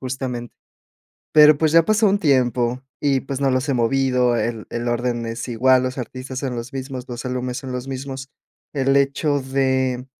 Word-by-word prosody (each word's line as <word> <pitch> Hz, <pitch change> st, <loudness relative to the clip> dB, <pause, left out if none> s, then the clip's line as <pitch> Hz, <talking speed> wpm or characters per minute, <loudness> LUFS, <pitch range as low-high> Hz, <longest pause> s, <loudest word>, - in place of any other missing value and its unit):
justamente. 125 Hz, -2 st, -5 dB, 0.8 s
Pero, 150 Hz, -1 st, +8 dB
pues, 155 Hz, 0 st, +2 dB
ya 165 Hz, -, +7 dB
ha -, -, -2 dB
pasado 215 Hz, 0 st, +3 dB
un 205 Hz, -, +2 dB
tiempo, 125 Hz, -, +1 dB, 0.2 s
y, 140 Hz, -2 st, +2 dB
pues, 135 Hz, 0 st, -5 dB
no 135 Hz, -1 st, +2 dB
los 130 Hz, +2 st, 0 dB
he 140 Hz, -, +1 dB
movido, 125 Hz, 0 st, +2 dB
el 115 Hz, -2 st, -2 dB
el 120 Hz, 0 st, -3 dB
orden 120 Hz, 0 st, -1 dB
es 115 Hz, +1 st, -5 dB
igual, 125 Hz, +2 st, +3 dB
los 130 Hz, +1 st, -3 dB
artistas 130 Hz, +2 st, -6 dB
son 130 Hz, -3 st, -3 dB
los 115 Hz, +2 st, -6 dB
mismos, 130 Hz, -1 st, -6 dB
los 120 Hz, +1 st, -6 dB
álbumes 125 Hz, 0 st, -3 dB
son 130 Hz, -, -7 dB
los 125 Hz, +1 st, -5 dB
mismos. 135 Hz, 0 st, -6 dB, 0.4 s
El 135 Hz, -1 st, +1 dB
hecho 140 Hz, +1 st, +1 dB
de, 130 Hz, -1 st, 0 dB
130 Hz, 190 wpm, -21 LUFS, 125-135 Hz, 0.8 s, Pero